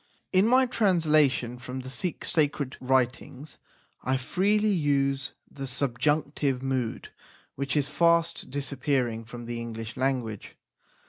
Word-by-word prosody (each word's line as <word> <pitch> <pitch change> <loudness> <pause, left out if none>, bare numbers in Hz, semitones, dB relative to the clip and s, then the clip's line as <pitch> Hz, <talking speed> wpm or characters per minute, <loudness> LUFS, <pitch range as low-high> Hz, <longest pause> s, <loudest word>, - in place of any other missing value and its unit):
In 190 +3 +5
my 255 +2 +5
translation 155 - +2
from 125 +2 -6
the 130 - -7
Sikh 145 +7 -3
sacred 145 -4 0
writings 130 +2 -1 0.4
I 130 +1 +1
freely 205 +10 +1
use 140 -5 +1 0.2
the 135 -1 -6
subjunctive 140 +1 0
mood 130 -4 -2 0.4
which 140 +2 -2
is 140 -1 +2
fast 170 +1 +2
disappearing 130 -4 -1
from 120 +1 -9
the 120 0 -4
English 115 -1 -6
language. 125 -6 -2
135 Hz, 120 wpm, -27 LUFS, 125-155 Hz, 0.4 s, In